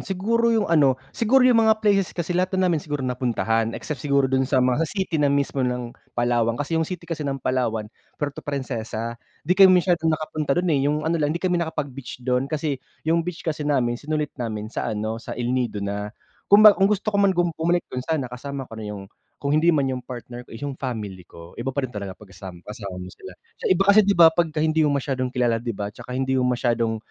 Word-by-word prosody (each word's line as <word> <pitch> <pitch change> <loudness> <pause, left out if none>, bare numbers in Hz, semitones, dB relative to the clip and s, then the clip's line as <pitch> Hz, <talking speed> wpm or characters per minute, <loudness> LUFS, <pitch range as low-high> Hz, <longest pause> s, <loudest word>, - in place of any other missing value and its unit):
siguro 225 +5 0
yung 225 -3 +2
ano, 140 -5 +4 0.2
siguro 250 +3 +3
yung 245 -3 +5
mga 220 0 +2
places 195 -3 +2
kasi 175 0 -2
lahat 185 +2 0
na 185 - +2
namin 170 -4 +2
siguro 145 -2 -4
napuntahan, 115 -3 0
except 150 -5 -6
siguro 140 0 +2
dun 130 0 +1
sa 140 - +1
mga 130 +5 +2
city 190 -5 -2
na 145 - +3
mismo 140 -1 0
ng 125 -2 -2 0.2
Palawan. 120 -1 +1
Kasi 155 +4 -1
yung 160 - -1
city 180 -2 -6
kasi 165 -2 -5
ng 135 - -1
Palawan, 115 -4 0 0.3
Puerto 145 -1 -4
Princesa, 115 -4 -4 0.2
'di 170 - +2
kami 190 +1 +8 0.2
masyadong 170 -3 +1
nakapunta 155 -2 -1
do'n 175 - +1
eh, 140 - +2
yung 150 +1 -1
ano 165 0 0
lang, 145 - +2
hindi 170 +5 -3
kami 180 -1 +2
nakapag-beach 140 -6 -5
do'n, 125 +1 0
kasi 145 -3 -2 0.2
yung 165 +2 +2
beach 170 0 -6
kasi 150 -2 -2
namin 120 -4 +1
sinulit 150 -1 -2
namin 110 -2 -4
sa - - -2
ano, 110 +1 -3
sa - - -7
El 120 0 -1
Nido 120 -5 -1
na. 100 +1 -3 0.4
Kumba 210 +1 +9
kung 195 0 +2
gusto 210 +1 0
ko 200 - +2
man 195 -2 +3
gum 175 -1 +2
bumalik 170 +2 0
do'n 125 - -2
sana 130 -2 -2
kasama 135 +2 -5
ko 115 -2 -10
na - - -6
yung 100 - -8 0.3
kung 140 0 -2
hindi 155 +3 +3
man 155 -5 +4
yung 130 - -3
partner 120 -1 -8
ko, - - -9
yung 140 +4 -4
family 105 -8 -4
ko, 85 +1 -13
iba - - -3
pa 135 +1 -1
rin 125 - -6
talaga 100 -3 -6
pag 105 -3 -16
kasama 90 -1 -10
kasama 100 -3 -7
mo 90 0 -8
sila. - - -12 0.2
So - - -1
iba 185 +1 +3
kasi 200 +2 +7
'di 200 -1 +2
ba, 165 -1 +8
'pagka 160 -2 0
hindi 160 0 +2
mo 145 - +1
masyadong 130 -2 -2
kilala, 120 -2 0
'di 115 -3 -4
ba, 100 0 -4
'tsaka 125 +4 -7
hindi 130 0 +1
yung 125 - +2
masyadong 120 -2 0
140 Hz, 230 wpm, -23 LUFS, 120-165 Hz, 0.4 s, Kumba